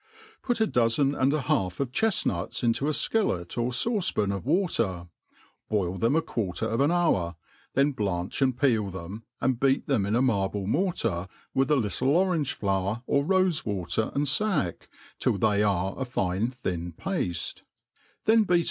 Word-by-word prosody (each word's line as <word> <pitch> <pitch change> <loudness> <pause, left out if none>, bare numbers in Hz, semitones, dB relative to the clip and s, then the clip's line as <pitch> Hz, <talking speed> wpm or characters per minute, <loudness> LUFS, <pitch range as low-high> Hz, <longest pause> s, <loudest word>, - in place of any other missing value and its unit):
PUT 245 -2 -1
a 220 - +4
dozen 125 - +2
and 135 -1 +2
a 155 0 0
half 95 -8 0
of 135 -3 -1
chefnuts 190 - 0
into 120 +4 +1
a - - +2
fkillet 145 - 0
or 120 0 0
(auce 190 - +1
pan 105 -2 0
#f 100 -1 -4
water» 115 - 0 0.6
boil 95 -4 -1
tbegi 120 - +2
a - - +3
quarter 105 -1 -3
of 115 +3 0
an 140 - +4
hour, 100 - +1 0.4
then 140 +2 +3
blanch 95 -4 -3
and 130 -2 +2
peel 115 -8 +2
|tiem» 95 +4 -7 0.2
arn) 130 - +2
beat 135 +2 +1
th^m 110 -9 +1
in 105 - +1
a 120 - +3
marble 100 -5 0
mortar, 115 - 0 0.3
with 135 +1 +1
a 150 - +4
litde 110 -7 -1
orange 160 +1 +2
flower 100 +3 -1
or 140 +2 +2
rofe 185 -1 +2
water 100 +1 -2
^nd 145 +1 +1
fack* 170 - 0 0.3
till - - +1
they 105 0 +2
are 95 -2 +1
a - - 0
fi^e 105 -2 -1
thin 90 -9 -4
pafte^ 95 - -3 0.6
then 225 +1 +5
beat. 180 -3 +3
120 Hz, 175 wpm, -27 LUFS, 95-150 Hz, 0.6 s, then